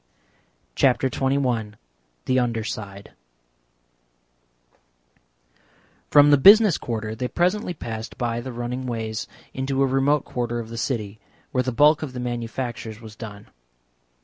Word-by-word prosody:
CHAPTER 130 - +2
XXI 125 -6 0 0.5
THE 130 0 +2
UNDER 115 -2 -1
SIDE 100 -2 -7 3.0
From 145 0 +7
the 145 - +6
Business 205 +2 +7
Quarter 110 -2 -4
they 125 +3 -3
presently 180 - 0
passed 115 -5 -6
by 120 -1 -2
the 130 +2 -6
running 120 +2 -4
ways 110 -2 -3 0.3
into 135 +1 0
a - - +4
remote 135 +2 +2
quarter 120 -1 -3
of 115 -1 -5
the 115 - -7
city, 110 -5 -3 0.3
where 125 - +1
the 130 - -2
bulk 150 +5 +4
of 145 -5 -5
the 125 - -5
manufactures 120 -2 -4
was 110 -2 -11
done. 105 -2 -10
125 Hz, 130 wpm, -23 LUFS, 115-135 Hz, 3.0 s, From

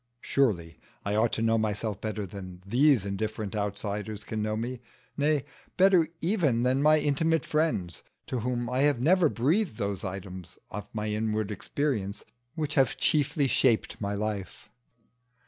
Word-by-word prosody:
Surely 90 -12 0 0.3
I 100 - 0
ought 110 +2 +2
to 115 - 0
know 115 0 +3
myself 105 -1 -2
better 110 -1 -3
than 95 -1 -9
these 125 +1 +4
indifferent 105 +1 -3
outsiders 105 0 -3
can 110 -1 -3
know 110 0 -1
me; 120 +2 -4 0.3
nay, 145 -1 +1 0.3
better 185 -4 +5
even 160 - +2
than 130 +2 +2
my 155 +1 +6
intimate 155 +2 +1
friends, 150 - -1 0.2
to 125 - -3
whom 120 +1 -2
I 125 +1 -1
have 145 -3 +3
never 165 +4 +4
breathed 150 - +1
those 100 -4 -2
items 95 -1 -7
of 105 +1 -6
my 105 0 -3
inward 110 0 -1
experience 105 -2 -2 0.3
which 155 -2 -2
have 135 -3 +2
chiefly 145 -1 +2
shaped 120 -4 +2
my 100 0 -1
life. 105 -2 -4
110 Hz, 150 wpm, -28 LUFS, 100-145 Hz, 0.3 s, my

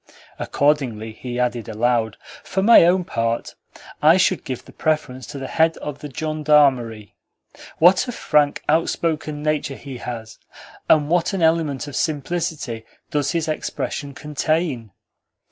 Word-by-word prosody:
Accordingly 130 -7 0
he 120 +2 -6
added 120 -2 -1
aloud: 110 -1 0 0.3
"For 190 +1 -1
my 225 -5 +8
own 180 +1 +3
part, 115 -6 -2 0.5
I 160 +4 +6
should 185 -1 +2
give 130 -3 -6
the - - -14
preference 140 -6 -2
to - - -7
the 135 - -5
Head 160 +4 +2
of 145 -1 -6
the 150 - -7
Gendarmery. 140 - +1 0.6
What 180 +6 +5
a - - -2
frank, 150 -10 +1
outspoken 155 -1 0
nature 150 -2 -1
he 135 -2 -8
has! 115 -2 -7 0.5
And 150 -2 +5
what 175 +4 +1
an 190 -3 -1
element 160 -5 +1
of 145 - -7
simplicity 150 -6 -2 0.3
does 145 +1 0
his 165 -1 -1
expression 145 -2 -4
contain!" 150 -5 -1
150 Hz, 140 wpm, -21 LUFS, 125-160 Hz, 0.6 s, my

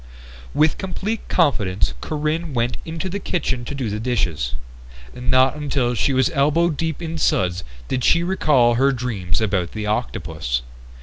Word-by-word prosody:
With 155 -1 +3
complete 195 +4 -3
confidence 100 - +1
Corinne 155 0 -2
went 120 +1 0
into 165 +3 -4
the 195 +2 -3
kitchen 135 -9 -1
to 145 - -5
do 130 -4 -2
the 105 0 -2
dishes. 90 - -1 0.6
Not 130 +2 +3
until 140 -5 0
she 120 +4 +1
was 130 +5 +2
elbow 160 +3 +3
deep 160 +2 -3
in 165 0 -4
suds 90 - +1 0.2
did 130 - -1
she 170 +6 +4
recall 150 -10 +3
her 135 +4 +3
dreams 115 -7 -2
about 95 -5 0
the 110 -1 -4
octopus. 80 - -2
130 Hz, 150 wpm, -22 LUFS, 105-155 Hz, 0.6 s, she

